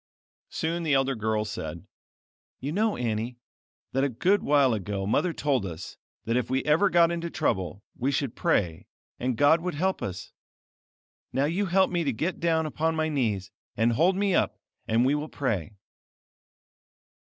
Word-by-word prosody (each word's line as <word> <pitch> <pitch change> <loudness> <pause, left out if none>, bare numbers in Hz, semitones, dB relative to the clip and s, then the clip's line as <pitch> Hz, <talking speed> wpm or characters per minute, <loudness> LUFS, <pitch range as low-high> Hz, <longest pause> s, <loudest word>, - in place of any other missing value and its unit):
Soon 165 +2 -2
the 155 -4 +2
elder 135 0 +2
girl 110 -2 -1
said: 85 -6 -6 0.7
"You 140 - -3
know, 210 +5 +1
Annie, 115 0 -2 0.5
that 135 +1 +1
a 140 - +2
good 180 - +2
while 140 -4 +4
ago 100 -1 -3
Mother 170 - +1
told 140 -7 0
us 85 -4 -7 0.3
that 115 - 0
if 125 -2 0
we 130 +1 0
ever 160 +7 +4
got 170 -1 +5
into 170 0 -3
trouble 95 - -1
we 130 - -1
should 140 -3 -1
pray 85 -5 0 0.3
and, 125 -1 -1
God 145 +5 +5
would 180 -2 -3
help 190 +5 0
us. 95 -2 -5 1.0
Now 135 +2 +1
you 185 +6 0
help 190 +2 +3
me 175 -1 0
to 140 - +1
get 165 +11 -2
down 165 -2 +2
upon 160 +2 -1
my 160 0 0
knees, 110 -10 -1 0.3
and 115 +2 +3
hold 175 +10 +3
me 200 0 +1
up, - - +1 0.3
and 115 +3 +3
we 135 - +3
will 150 +1 -2
pray." 105 - -2
140 Hz, 170 wpm, -27 LUFS, 110-165 Hz, 1.0 s, got